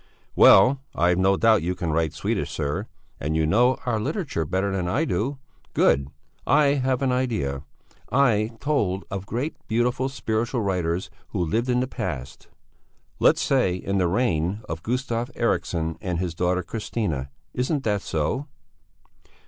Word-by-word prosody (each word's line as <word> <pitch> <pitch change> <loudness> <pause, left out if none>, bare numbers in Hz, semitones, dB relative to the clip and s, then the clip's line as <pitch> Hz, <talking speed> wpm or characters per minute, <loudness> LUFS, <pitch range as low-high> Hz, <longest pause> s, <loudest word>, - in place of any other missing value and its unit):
"Well, 130 +8 +7
I've 90 +2 +2
no 95 +1 +3
doubt 110 -3 +4
you 90 +3 -1
can 85 -3 -2
write 80 -1 +1
Swedish, - - -2
sir. 70 0 -3 0.3
And 75 +2 -2
you 80 -1 +2
know 120 +10 +3
our 115 -3 0
literature 135 - -2
better 95 +5 -1
than 95 -2 -1
I 145 - +1
do. 135 0 -1 0.4
Good! 70 -1 +3 0.4
I 150 -2 +5
have 130 0 0
an 130 - +2
idea. 110 - -1 0.5
I 140 -1 +4 0.2
am 115 - -18
told 105 -10 0
of 100 0 -4
great, 125 +9 -2
beautiful, 125 +3 +1
spiritual 120 -1 -1
writers 90 -2 -1 0.2
who 90 - -2
lived 115 +10 -1
in 125 0 +2
the 130 - -1
past, 70 - -5 0.7
let's - - +4
say 125 -10 +2
in 100 +2 -2
the 90 - +2
reign 95 -2 0
of 80 0 -5
Gustav 120 +2 -2
Eriksson 85 -7 -1
and 90 -2 -2
his 90 -1 -2
daughter 90 +2 0
Christina. 85 - -3 0.2
Isn't 135 +3 -1
that 105 -3 0
so?" 110 - -2
100 Hz, 155 wpm, -24 LUFS, 85-125 Hz, 0.7 s, Well